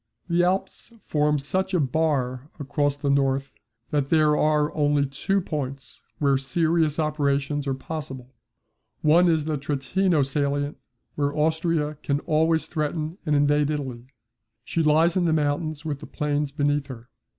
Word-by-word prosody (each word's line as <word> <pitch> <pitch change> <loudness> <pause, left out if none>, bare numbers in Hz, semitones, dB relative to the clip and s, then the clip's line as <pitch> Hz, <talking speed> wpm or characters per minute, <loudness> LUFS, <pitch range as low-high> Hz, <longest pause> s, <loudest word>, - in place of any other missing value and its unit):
The 175 0 +2
Alps 190 +5 -1
form 150 0 +1
such 185 +7 -1
a - - +3
bar 135 -2 0
across 145 0 0
the 140 -1 0
north 135 -1 +1 0.4
that 145 -2 0
there 155 -2 +4
are 150 0 +2
only 145 -1 +2
two 140 +9 -1
points 140 -6 -5 0.2
where 140 -2 +2
serious 160 +2 +1
operations 145 -2 0
are 135 - 0
possible. 135 -3 -7 0.7
One 170 +4 +5
is 160 -3 +2
the 155 -1 -1
Trentino 150 +4 +1
Salient 145 +1 -1 0.4
where 145 0 -1
Austria 155 -1 0
can 140 0 0
always 160 +1 +1
threaten 155 +3 -3
and 150 - +3
invade 145 0 +3
Italy. 130 -5 -4 0.6
She 165 - -1
lies 160 +2 +3
in 180 -2 +2
the 160 - +2
mountains 155 0 -1
with 145 -3 -3
the - - -10
plains 145 -1 -1
beneath 145 0 0
her. 120 -3 -10
150 Hz, 150 wpm, -25 LUFS, 140-160 Hz, 0.7 s, One